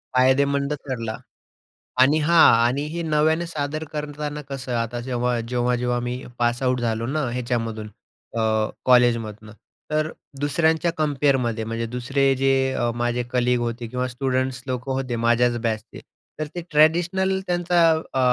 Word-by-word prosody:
फायदेमंद 140 Hz, +2 st, +3 dB
ठरला. 125 Hz, -6 st, -5 dB, 0.8 s
आणि 140 Hz, +4 st, +5 dB
हां. 165 Hz, +2 st, +6 dB
आणि 130 Hz, +4 st, 0 dB
हे 170 Hz, +2 st, -4 dB
नव्याने 160 Hz, +1 st, +1 dB
सादर 155 Hz, -1 st, -3 dB
करताना 150 Hz, 0 st, -4 dB
कसं 135 Hz, -2 st, -4 dB
आता 115 Hz, +1 st, -2 dB
जेव्हा 125 Hz, -1 st, -1 dB
जेव्हा-जेव्हा 125 Hz, +1 st, 0 dB
मी 120 Hz, +1 st, -4 dB, 0.2 s
पासआऊट 120 Hz, +1 st, +1 dB
झालो 115 Hz, -1 st, -1 dB
ना 150 Hz, +3 st, -1 dB
ह्याच्यामधून 115 Hz, -3 st, -3 dB, 0.5 s
अ, -, -, +1 dB, 0.4 s
कॉलेजमधनं, 115 Hz, -4 st, +2 dB, 0.4 s
तर 155 Hz, 0 st, +1 dB, 0.3 s
दुसऱ्यांच्या 160 Hz, +3 st, +2 dB
कम्पेअरमध्ये, 135 Hz, -6 st, +1 dB
म्हणजे 115 Hz, +1 st, -3 dB
दुसरे 135 Hz, +2 st, +1 dB
जे 135 Hz, +1 st, +2 dB, 0.2 s
अ, 120 Hz, -2 st, 0 dB
माझे 120 Hz, +1 st, -1 dB
कलीग 125 Hz, -1 st, +2 dB
होते 120 Hz, 0 st, -3 dB
किंवा 125 Hz, +2 st, -2 dB
स्टुडंट्स 130 Hz, 0 st, -2 dB
लोकं 130 Hz, 0 st, -3 dB
होते 130 Hz, -2 st, -2 dB
माझ्याच 120 Hz, +1 st, +2 dB
बॅचचे. 110 Hz, -2 st, -3 dB, 0.4 s
तर 155 Hz, -, -1 dB
ते 175 Hz, -, -3 dB
ट्रॅडिशनल, 175 Hz, +5 st, +3 dB
त्यांचा 175 Hz, -1 st, +3 dB
अ, 160 Hz, -4 st, -3 dB
130 Hz, 135 wpm, -23 LUFS, 120-150 Hz, 0.8 s, हां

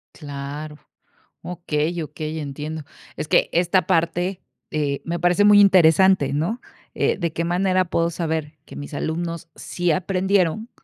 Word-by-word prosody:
Claro. 145 Hz, +1 st, -7 dB, 0.7 s
Okey, 170 Hz, -1 st, -2 dB
okey, 155 Hz, +1 st, -5 dB
entiendo. 150 Hz, +2 st, -5 dB, 0.3 s
Es -, -, -4 dB
que -, -, +3 dB
esta 180 Hz, +2 st, +2 dB
parte, 175 Hz, +3 st, 0 dB, 0.3 s
eh, 145 Hz, -2 st, -1 dB
me 170 Hz, 0 st, -3 dB
parece 175 Hz, +3 st, +3 dB
muy 205 Hz, 0 st, +7 dB
interesante, 185 Hz, -4 st, +5 dB
¿no? 175 Hz, -, -1 dB, 0.3 s
Eh, -, -, +1 dB
¿de 170 Hz, -2 st, -2 dB
qué 170 Hz, +1 st, -2 dB
manera 185 Hz, +1 st, +1 dB
puedo 170 Hz, -1 st, 0 dB
saber 160 Hz, -2 st, -3 dB
que -, -, -12 dB
mis 145 Hz, +1 st, -8 dB
alumnos 165 Hz, +2 st, -3 dB
sí 175 Hz, -1 st, -2 dB
aprendieron, 190 Hz, +4 st, 0 dB
170 Hz, 140 wpm, -22 LUFS, 155-185 Hz, 0.7 s, muy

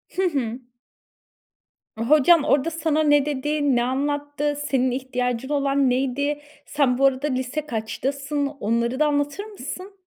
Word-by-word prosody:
Hı 380 Hz, -, +1 dB
hı. 250 Hz, -6 st, -2 dB, 1.4 s
Hocan 295 Hz, +7 st, +4 dB
orada 285 Hz, +4 st, +2 dB
sana 315 Hz, -1 st, 0 dB
ne 290 Hz, -2 st, +4 dB
dedi, 290 Hz, -1 st, 0 dB
ne 240 Hz, -, +2 dB
anlattı, 290 Hz, +3 st, -1 dB
senin 260 Hz, -2 st, +1 dB
ihtiyacın 250 Hz, -1 st, -2 dB
olan 280 Hz, -2 st, +2 dB
neydi? 275 Hz, +3 st, -1 dB, 0.2 s
Sen 275 Hz, -4 st, +1 dB
bu 275 Hz, -, +3 dB
arada 270 Hz, +2 st, +2 dB
lise 260 Hz, +2 st, -2 dB
kaçtasın, 275 Hz, +4 st, -2 dB
onları 235 Hz, -2 st, -1 dB
da 305 Hz, -, +4 dB
anlatır 290 Hz, +6 st, -1 dB
mısın? 390 Hz, -1 st, -8 dB
280 Hz, 130 wpm, -23 LUFS, 255-295 Hz, 1.4 s, Hocan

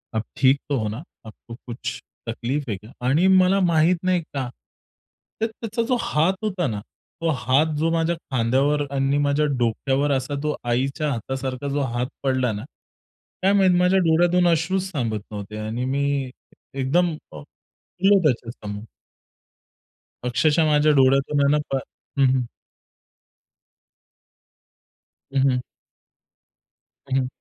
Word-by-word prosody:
आप 110 Hz, -, 0 dB
ठीक 135 Hz, -1 st, +4 dB
तो 140 Hz, -, +1 dB
हो 110 Hz, -, -1 dB
ना? 110 Hz, +8 st, -6 dB, 0.2 s
आपको 115 Hz, +1 st, -11 dB
कुछ 120 Hz, -1 st, -6 dB, 0.3 s
तकलीफ 130 Hz, +5 st, -2 dB
है 105 Hz, -, -1 dB
क्या? 105 Hz, +5 st, -15 dB, 0.2 s
आणि 155 Hz, +8 st, +4 dB
मला 190 Hz, +1 st, +5 dB
माहीत 170 Hz, 0 st, +3 dB
नाही 185 Hz, -1 st, +2 dB
का, 135 Hz, -5 st, -5 dB, 0.9 s
तर 225 Hz, -, +2 dB
त्याचा 225 Hz, 0 st, -4 dB
जो 250 Hz, -, +2 dB
हात 160 Hz, +5 st, +2 dB
होता 185 Hz, -6 st, -1 dB
ना, 105 Hz, -4 st, -3 dB, 0.4 s
तो 165 Hz, -, +1 dB
हात 135 Hz, +5 st, +3 dB
जो 160 Hz, +2 st, +1 dB
माझ्या 165 Hz, +1 st, +1 dB
खांद्यावर 140 Hz, +1 st, 0 dB
आणि 135 Hz, +1 st, +1 dB
माझ्या 145 Hz, +1 st, +2 dB
डोक्यावर 130 Hz, +4 st, 0 dB
असा 135 Hz, +1 st, -1 dB
तो 150 Hz, 0 st, 0 dB
आईच्या 135 Hz, +5 st, 0 dB
हातासारखा 130 Hz, +2 st, -4 dB
जो 145 Hz, -, 0 dB
हात 125 Hz, +1 st, 0 dB, 0.2 s
पडला 130 Hz, -3 st, +1 dB
ना, 105 Hz, 0 st, -5 dB, 0.8 s
काय 195 Hz, +2 st, +3 dB
माहीत 190 Hz, -3 st, +4 dB
माझ्या 180 Hz, +2 st, +4 dB
डोळ्यातून 175 Hz, +1 st, +3 dB
अश्रूच 185 Hz, +3 st, +1 dB
थांबत 115 Hz, -7 st, -2 dB
नव्हते 105 Hz, 0 st, -6 dB
आणि 120 Hz, +3 st, -2 dB
मी 140 Hz, 0 st, 0 dB, 0.4 s
एकदम 145 Hz, +7 st, +1 dB, 0.2 s
अ, -, -, -10 dB, 0.4 s
रडलो 195 Hz, +2 st, +2 dB
त्याच्यासमोर. 115 Hz, -7 st, -2 dB, 1.4 s
अक्षरशः 155 Hz, +6 st, +2 dB
माझ्या 150 Hz, 0 st, +4 dB
डोळ्यातून 135 Hz, +2 st, +3 dB
आहे 140 Hz, -, +4 dB
ना, 150 Hz, -, +4 dB, 0.2 s
प -, -, +1 dB, 0.4 s
हं, 135 Hz, -, +6 dB
हं. 130 Hz, -, +2 dB, 2.9 s
हं, 135 Hz, -, +2 dB
हं. 125 Hz, 0 st, 0 dB, 1.5 s
हं, 130 Hz, -, 0 dB
हं. 130 Hz, -1 st, +1 dB
140 Hz, 135 wpm, -23 LUFS, 125-170 Hz, 2.9 s, हं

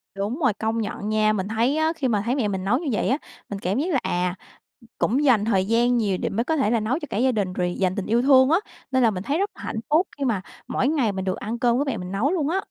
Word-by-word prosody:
Đúng 210 Hz, +9 st, -3 dB
rồi. 250 Hz, -8 st, +2 dB
Công 225 Hz, +2 st, -2 dB
nhận 205 Hz, 0 st, -4 dB
nha, 215 Hz, 0 st, +2 dB
mình 195 Hz, -2 st, -2 dB
thấy 230 Hz, +7 st, +1 dB
á, 315 Hz, +1 st, +2 dB
khi 280 Hz, -5 st, -1 dB
mà 215 Hz, -4 st, +1 dB
thấy 245 Hz, +3 st, +1 dB
mẹ 250 Hz, -7 st, 0 dB
mình 190 Hz, -2 st, -3 dB
nấu 235 Hz, +5 st, +2 dB
như 330 Hz, -, -5 dB
vậy 215 Hz, -, 0 dB
á, 265 Hz, -, +2 dB, 0.3 s
mình 200 Hz, -1 st, -5 dB
cảm 190 Hz, +4 st, -1 dB
giác 350 Hz, +5 st, -1 dB
là, 265 Hz, -, +3 dB
à, 180 Hz, 0 st, -1 dB, 0.6 s
cũng 270 Hz, +7 st, +1 dB
dành 230 Hz, -7 st, +4 dB
thời 190 Hz, -4 st, +2 dB
gian 240 Hz, +3 st, +2 dB
nhiều 200 Hz, -5 st, 0 dB
để -, -, -1 dB
mới 230 Hz, +4 st, -1 dB
có 320 Hz, -, 0 dB
thể 245 Hz, -7 st, +1 dB
là 235 Hz, -, +2 dB
nấu 235 Hz, +8 st, -1 dB
cho 305 Hz, -, -6 dB
cả 205 Hz, -, -3 dB
gia 260 Hz, +2 st, +3 dB
đình 200 Hz, -5 st, -1 dB
rồi 180 Hz, -1 st, -1 dB
dành 185 Hz, 0 st, 0 dB
tình 200 Hz, -, -3 dB
yêu 235 Hz, +2 st, +2 dB
thương 260 Hz, 0 st, +6 dB
á, 330 Hz, -, +5 dB, 0.3 s
nên 260 Hz, -1 st, +3 dB
là 225 Hz, -, +4 dB
mình 185 Hz, -1 st, -5 dB
thấy 290 Hz, +6 st, 0 dB
rất 400 Hz, +1 st, 0 dB
là -, -, -12 dB
hạnh 220 Hz, -, -3 dB
phúc 330 Hz, +5 st, +3 dB
khi 280 Hz, -, -2 dB
mà 220 Hz, -7 st, 0 dB, 0.3 s
mỗi 260 Hz, -, 0 dB
ngày 280 Hz, -8 st, +1 dB
mình 190 Hz, -1 st, -4 dB
được 185 Hz, -, -1 dB
ăn 230 Hz, +3 st, -4 dB
cơm 240 Hz, -2 st, +2 dB
của 280 Hz, -, +2 dB
mẹ 265 Hz, -5 st, -2 dB
mình 180 Hz, -1 st, -6 dB
nấu 230 Hz, -, +1 dB
luôn 310 Hz, -6 st, 0 dB
á. 375 Hz, +4 st, +1 dB
230 Hz, 305 wpm, -24 LUFS, 200-270 Hz, 0.6 s, thương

